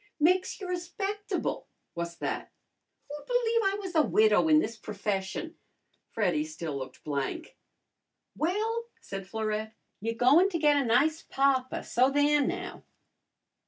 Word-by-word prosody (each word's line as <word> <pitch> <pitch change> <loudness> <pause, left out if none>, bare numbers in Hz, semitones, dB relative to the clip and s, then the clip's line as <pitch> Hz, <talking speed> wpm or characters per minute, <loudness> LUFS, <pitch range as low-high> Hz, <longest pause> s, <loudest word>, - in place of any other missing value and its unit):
"Makes 365 +5 +2
you 385 - -6
respectable." 390 +4 -3 0.3
"What's 170 0 -4
that?" - - -4 0.6
"Who'd 295 0 -9
believe 470 -2 +2
I 390 +1 +1
was 380 -3 -6
a 320 - +5
widow 215 0 +4
in 310 -1 +6
this 230 -7 0
profession?" 205 - -4 0.5
Freddy 180 -9 +1
still 155 -1 -5
looked 130 -1 -7
blank. 145 - -3 0.8
"Well," 440 +8 -1
said 195 -1 -7
Florette, 220 +1 -3 0.2
"you're 230 +2 -2
goin' 285 +11 +5
to 350 - -1
get 300 -2 +4
a 285 - +3
nice 285 +7 +2
papa, 270 -1 +1
so 255 +2 +3
there 290 +1 +3
now!" 365 +6 -3
285 Hz, 135 wpm, -29 LUFS, 210-355 Hz, 0.8 s, in